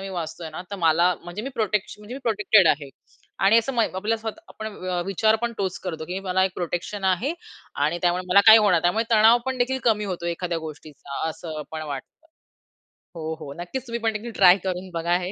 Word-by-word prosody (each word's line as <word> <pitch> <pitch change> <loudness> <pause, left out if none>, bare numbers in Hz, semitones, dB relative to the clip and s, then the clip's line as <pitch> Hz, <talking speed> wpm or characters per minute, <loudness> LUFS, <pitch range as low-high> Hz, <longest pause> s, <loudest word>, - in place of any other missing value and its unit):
मी 195 - -6
वाचतोय 170 -2 -5
ना, 155 - -7
तर 200 - -4
मला 170 +1 +3
म्हणजे 175 +4 -6
मी 265 - -4
प्रोटेक्श 210 -3 -1
म्हणजे 210 +4 -9
मी 275 - -7
प्रोटेक्टेड 210 -4 +4
आहे 145 -2 +1 0.6
आणि 225 +3 +6
असं 230 +4 -1
मय 230 -2 +2
आपल्या 210 +4 0
स्वतः 220 +7 -6
आपण 220 - -8 0.2
व 180 -1 -1
विचार 215 +3 +2
पण 235 0 -1
तोच 190 -1 -2
करतो, 160 -4 -4
की 180 +3 -4
मला 190 -1 +1
एक 190 - -1
प्रोटेक्शन 180 +3 -4
आहे 190 - +1 0.5
आणि 165 +4 0
त्यामुळे 175 +1 +1
मला 200 +2 +7
काही 220 0 +11
होणार 210 -3 +3
नाही. 170 -2 +3
त्यामुळे 195 +6 +2
तणाव 225 +1 +6
पण 260 -1 -2
देखील 260 +2 +1
कमी 215 -3 +2
होतो 180 -3 -4
एखाद्या 170 0 -2
गोष्टीचा 150 0 -6
असं 155 -1 -6
पण 160 0 -5
वाटतं. 140 - -10 0.9
हो, 160 -1 -4
हो. 145 -3 -8
नक्कीच. 250 +9 -6
तुम्ही 235 0 -3
पण 225 -1 +1
देखील 225 +2 -5
ट्राय 180 0 +8
करून 185 +1 -3
बघा 170 +1 +1
हे. 185 - -4
190 Hz, 215 wpm, -24 LUFS, 170-220 Hz, 0.9 s, काही